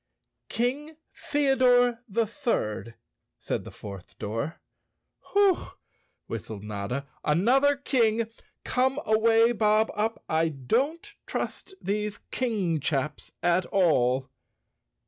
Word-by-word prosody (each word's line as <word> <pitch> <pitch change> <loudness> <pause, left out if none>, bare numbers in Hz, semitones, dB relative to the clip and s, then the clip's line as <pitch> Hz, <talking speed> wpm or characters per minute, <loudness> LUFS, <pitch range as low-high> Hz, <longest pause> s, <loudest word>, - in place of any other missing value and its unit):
"King 285 +6 -2 0.2
Theodore 255 -4 +3
the 225 +3 +1
Third," 215 - -2 0.4
said - - -3
the - - -7
fourth 100 -3 -10
door. 115 +10 -4 0.7
"Whew!" 400 -2 +3 0.5
whistled 105 -2 -6
Notta. 105 +6 -4 0.2
"Another 250 - +4
King! 230 -5 +1 0.4
Come 260 +2 +1
away, 225 +2 +4
Bob 215 -1 +3
Up, 220 +2 -2
I 160 +1 +2
don't 275 - -1
trust 385 - -4
these 210 +1 -2
king 205 -10 0
chaps 150 +1 -2
at 175 +1 +2
all." 130 -8 +2
220 Hz, 100 wpm, -27 LUFS, 150-255 Hz, 0.7 s, Another